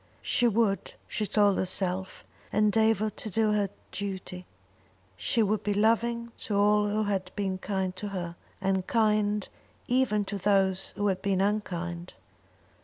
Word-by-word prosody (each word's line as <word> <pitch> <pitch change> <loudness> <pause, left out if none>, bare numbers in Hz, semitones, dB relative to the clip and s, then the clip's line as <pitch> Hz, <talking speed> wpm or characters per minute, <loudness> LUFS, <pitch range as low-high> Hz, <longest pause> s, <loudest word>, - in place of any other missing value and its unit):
She 245 - +2
would, 220 -3 +1
she 210 - -2
told 205 -1 +3
herself, 185 0 -1 0.3
endeavour 215 0 +3
to 215 - -6
do 215 +1 +2
her 205 -2 +1 0.2
duty; 190 -2 -5 0.7
she 225 - +1
would 210 0 +1
be 205 -1 -1
loving 235 +2 +1
to 210 - -2
all 210 +1 +4
who 215 +1 0
had 200 -2 -1
been 190 -2 -2
kind 190 -2 -2
to 205 - -3
her, 175 -4 -4 0.2
and 190 -1 0
kind 210 -2 +2 0.4
even 240 -5 +2
to 200 0 -4
those 195 -1 +2
who 205 - -1
had 190 -2 +1
been 195 -2 +1
unkind. 180 -4 -2
205 Hz, 145 wpm, -28 LUFS, 190-215 Hz, 0.7 s, all